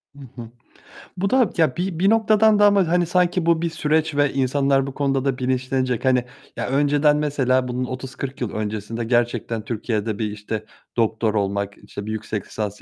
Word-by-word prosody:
Hı - - -14 0.2
hı. 115 - -10 0.7
Bu 195 +2 0
da, 255 -4 +3
ya, 155 -6 +2
bi 180 -2 -2
bir 195 +2 +4
noktadan 220 -1 +4
da 205 - +6
ama, 200 -4 +4
hani, 175 +1 +2
sanki 180 0 +1
bu 170 -1 +3
bir 170 - 0
süreç 155 -1 0
ve 145 -1 +2
insanlar 135 0 +1
bu 135 - -6
konuda 135 -1 0
da 135 -2 0
bilinçlenecek. 130 -1 -1
Hani, 125 -1 +3 0.3
ya, - - -2
önceden 145 +2 +3
mesela 130 -4 +1
bunun 125 +1 -2
30-40 130 +1 -6
yıl 120 - -2
öncesinde 110 +2 -4
gerçekten 120 -2 -1
Türkiye'de 110 -2 -2
bir, 105 -2 -1
işte, 105 +1 -5 0.3
doktor 110 -1 +1
olmak, 100 -1 -1
işte, 100 - -9
bir 110 - -4
yüksek 110 -2 -4
lisans 105 -2 -5
130 Hz, 185 wpm, -22 LUFS, 115-160 Hz, 0.7 s, da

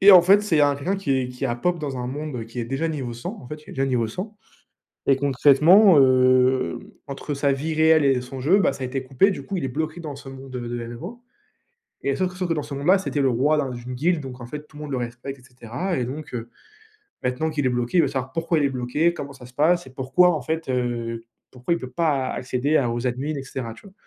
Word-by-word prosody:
et 200 +1 +9
en 180 - +11
fait, 200 +4 +5
c'est 180 -7 +1
il - - +3
y - - +6
a 145 -1 +4
quelqu'un 180 +8 -1
qui 195 -7 -4
est 125 -1 -2
qui 125 +2 -3
a 120 - -1
pop 175 +6 0
dans 140 -4 -4
un 125 - -3
monde 140 -3 -5
qui 115 +2 -9
est - - -2
déjà 135 +6 -1
niveau 135 -6 -4
100 120 - -6
en 125 - -12
fait, 150 +1 -8
il - - -12
est - - -9
déjà 135 0 0
niveau 120 -4 0
100, 200 - -6 0.7
et 135 - +5
concrètement, 145 - +6
hem, 130 -5 +4 0.3
entre 140 +2 -4
sa 140 0 +1
vie 155 +4 -2
réelle 160 -1 +5
et 135 -2 +3
son 130 +1 -8
jeu, 170 +10 +4
bah, 140 - +3
ça 135 - -8
a - - -1
été 135 +1 -3
coupé. 135 +10 +3
Du - - -5
coup 195 - -4
il - - -3
est - - -1
bloqué 155 +5 -3
dans 150 -4 -6
ce 140 - -11
monde, 135 0 -10
heu, 120 -1 -5
de 120 -1 -4
MMO, 175 - -8 0.8
et 140 - 0
sauf 185 -1 0
que 180 - -13
sauf 180 - -1
que 165 - +1
dans 150 - -2
ce - - -9
monde-là, 155 +8 +4
c'était 170 -6 -2
le 135 - +3
roi 145 +6 +2
d'un 140 - 0
d'une 125 0 -7
guilde, 160 +4 +1
donc 130 -1 -8
en 120 - -7
fait 150 +4 -8
tout 150 - -18
le - - -8
monde 145 - -6
le - - 0
respecte 120 +3 -6
et - - -21
cetera, 130 - -4
et 125 - 0
donc, 145 +4 -7
heu, 115 -1 -5 0.7
maintenant 125 +6 -1
qu'il 150 -2 -2
est - - +5
bloqué, 120 +7 0
il 170 - +7
veut 140 - +2
savoir 130 -1 -4
pourquoi 165 0 0
il 145 - +2
est - - -1
bloqué, 135 +7 0
comment 140 -4 -6
ça 125 -2 -12
se 125 - -17
passe 165 +3 +2
et - - -11
pourquoi 175 +8 +3
en 150 - -3
fait, 160 +4 -3
heu, 120 -2 -2 0.3
pourquoi 130 +7 -1
il - - -2
peut 130 - -6
pas 140 -2 0
accéder 130 +4 0
à 125 -4 +1
aux 120 +2 -2
admin 135 +5 -2
et 135 - -4
cetera, 125 -3 -5
tu - - -16
vois? 195 - -14
140 Hz, 280 wpm, -23 LUFS, 125-160 Hz, 0.8 s, en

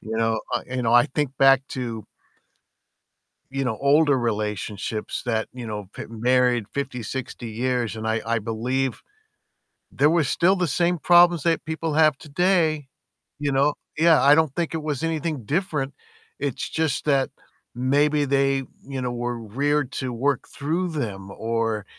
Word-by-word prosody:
You 110 +1 -5
know, 115 0 +1
uh, - - 0
you 130 0 -3
know, 115 -1 +1
I 120 +3 +6
think 145 -1 -2
back 135 0 +6
to 115 -4 -4 1.5
you 135 -1 -1
know, 110 -3 -1
older 145 0 +4
relationships 105 -2 -3
that, 110 -2 -1
you 125 -2 -7
know, 105 -3 -6
been 115 -1 -8
married 125 -1 +3
50, 135 -4 -3
60 120 0 -5
years 120 -1 -1
and 110 0 -4
I 110 0 0
I 115 0 0
believe 120 +4 -2 0.9
there 145 +2 +3
were 165 0 +3
still 175 +6 +3
the 180 -2 0
same 175 +4 +1
problems 175 -1 +5
that 165 -1 +1
people 160 -1 -3
have 155 -3 +4
today, 155 -1 +1 0.5
you 145 -1 -1
know? 140 +2 +3 0.2
Yeah, 165 0 +5
I 145 +1 +7
don't 160 -3 +2
think 170 -2 -1
it 160 - -2
was 150 -2 -3
anything 160 -4 -2
different. 150 - -1 0.5
It's 140 -3 -3
just 160 -4 -1
that 140 -3 +2 0.5
maybe 145 +4 +2
they, 135 0 +2 0.2
you 135 -2 -4
know, 125 -1 -2
were 120 0 -3
reared 140 +5 -1
to 130 -2 -3
work 135 +2 0
through 165 +6 -2
them 100 -10 -4
or, 115 -1 -2
135 Hz, 160 wpm, -24 LUFS, 115-150 Hz, 1.5 s, I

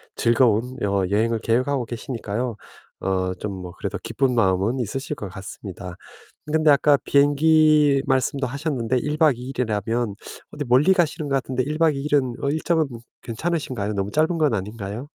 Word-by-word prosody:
즐거운 120 +1 +2
어 100 -1 +1
여행을 115 +2 +2
계획하고 130 +3 0
계시니까요 120 -1 -4 0.5
어 95 -1 0
좀 105 +1 -4
뭐 90 -1 -7
그래도 - - -4
기쁜 135 -2 0
마음은 105 +2 +1
있으실 135 +7 -3
것 105 -6 -7
같습니다. 95 -2 -8 0.6
근데 155 -1 +4
아까 145 0 +5
비행기 150 0 +4
말씀도 135 0 +1
하셨는데 130 -3 -2
1 150 +4 -2
박 150 -7 +4
2 125 - -8
일이라면 115 -3 -1 0.4
어디 145 - -4
멀리 145 +10 +5
가시는 160 -4 0
것 135 - +1
같은데 130 -1 -1
1 150 +3 -3
박 160 -3 +3
2 135 - -4
일은 140 -4 +1
어 140 - 0
일정은 160 +1 +1 0.3
괜찮으신가요? 125 -5 -3
너무 100 0 -2
짧은 160 +7 +1
건 150 -7 +2
아닌가요? 105 +4 -5
130 Hz, 345 characters per minute, -23 LUFS, 110-145 Hz, 0.6 s, 아까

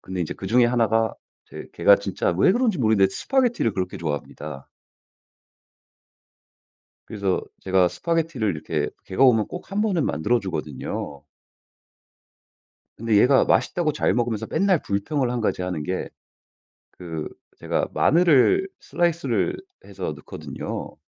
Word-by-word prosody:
근데 95 -1 -5
이제 80 - -3
그 95 - -7
중에 120 +4 +4
1 120 -3 +2
가 110 0 +1 0.3
이제 - - -10
걔가 100 - +5
진짜 100 -1 -2
왜 100 - +4
그런지 230 - +1
모르겠는데 110 -5 +3
스파게티를 245 - +1
그렇게 90 -1 -3
좋아합니다. 75 -2 -6 2.4
그래서 100 -3 -1 0.2
제가 95 -1 +3
스파게티를 165 - -1
이렇게 75 -2 -3
걔가 95 - -1
오면 110 -5 +4
꼭 180 - -9
1 200 - -1
번은 195 -8 +1
만들어 110 +10 +1
주거든요. 75 -5 -5 1.8
근데 110 -1 +1
얘가 130 +5 +5
맛있다고 165 -4 +1
잘 - - +1
먹으면서 115 -2 -1
맨날 190 -4 +2
불평을 120 +7 -1
1 125 -1 -2
가지 110 - -1
하는게 90 0 -3 0.8
그 80 -4 -6 0.3
제가 - - -1
마늘을 175 - +4
슬라이스를 175 - 0 0.3
해서 - - -5
넣거든요. - - -7
110 Hz, 295 characters per minute, -23 LUFS, -, 2.4 s, 걔가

